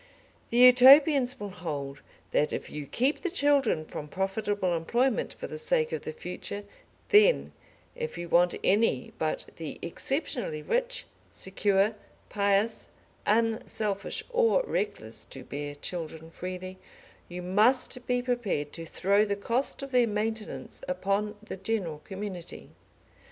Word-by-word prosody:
The 235 - -1
Utopians 255 +2 +7
will 205 -1 -5
hold 145 -6 -5 0.3
that 150 - +2
if - - -5
you 150 -1 -6
keep 265 - +1
the 365 - -1
children 280 - +2
from 150 - -7
profitable 195 +1 -1
employment 235 +10 0
for - - -7
the 465 - -6
sake 475 0 +1
of - - -3
the - - -5
future, 460 - -6 0.5
then, 425 +4 +5 0.4
if 475 -1 -5
you 175 - -5
want 175 +1 +4
any 200 - +2
but 155 -1 -1
the 160 -2 -6
exceptionally 220 - -3
rich, - - -1 0.3
secure, 195 +2 +1 0.4
pious, 200 +2 +1 0.4
unselfish, 215 -2 0
or 475 +1 +3
reckless 200 - -2
to 135 - -10
bear 145 +2 -5
children 160 +1 -6
freely, 185 +1 -6 0.5
you 180 0 -6
must 240 +6 +2
be 245 0 +1
prepared 220 - -1
to 165 -1 -8
throw 200 +5 +2
the 200 -1 -1
cost 235 +7 -2
of 275 - -7
their 250 -2 +4
maintenance 215 +1 -3
upon 200 +3 -1
the 215 - -7
general 190 -6 -2
community. 190 0 -7
205 Hz, 135 wpm, -28 LUFS, 175-250 Hz, 0.5 s, Utopians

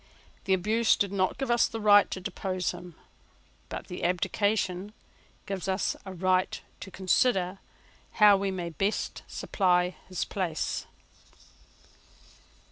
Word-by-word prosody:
The 190 - +3
abuse 220 +5 +2
did 200 -1 0
not 190 -2 0
give 270 -3 -2
us 235 0 +3
a - - -2
right 205 -1 +6
to - - -4
depose 185 -1 -2
him: 175 -2 -10 0.7
but - - -6
the 180 - -7
abdication 190 +2 0 0.5
gives 195 -3 -4
us 190 +1 0
a - - -5
right 185 +1 +1 0.2
to - - -8
consider 190 0 +1 0.5
how 210 -2 +7
we 195 0 -1
may 175 -3 -4
best 195 +6 -2
supply 180 -2 +1
his 185 - -2
place. 175 -5 -3
190 Hz, 125 wpm, -28 LUFS, 180-205 Hz, 0.7 s, how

